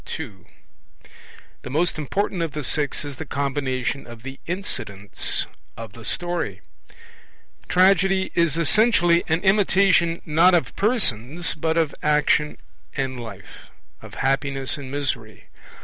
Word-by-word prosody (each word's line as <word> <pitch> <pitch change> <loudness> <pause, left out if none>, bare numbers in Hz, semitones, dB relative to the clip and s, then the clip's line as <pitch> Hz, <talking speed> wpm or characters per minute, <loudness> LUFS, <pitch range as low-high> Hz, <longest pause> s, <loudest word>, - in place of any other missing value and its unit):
II. 105 - -9 1.1
The - - -8
most 160 +4 0
important 185 +5 -2
of 165 -4 -2
the 150 - -4
six 145 +1 0
is 140 -2 -7
the 160 - -6
combination 135 -2 -2
of 120 -1 -11
the 135 +1 -8
incidents 100 - -1 0.3
of 115 -3 -8
the 115 -1 -12
story. 175 - -2 1.1
Tragedy 190 +1 +3
is 170 -3 +2
essentially 175 -1 +4
an 160 +1 +1
imitation 190 -4 +3
not 170 +4 +5
of 170 - -1
persons 170 - +2
but 160 +1 -1
of 160 -3 +1
action 150 0 +2 0.4
and 130 -2 -2
life, 110 -5 -11 0.3
of - - -12
happiness 135 0 0
and 140 -3 -8
misery. 130 -6 -4
150 Hz, 125 wpm, -23 LUFS, 130-175 Hz, 1.1 s, not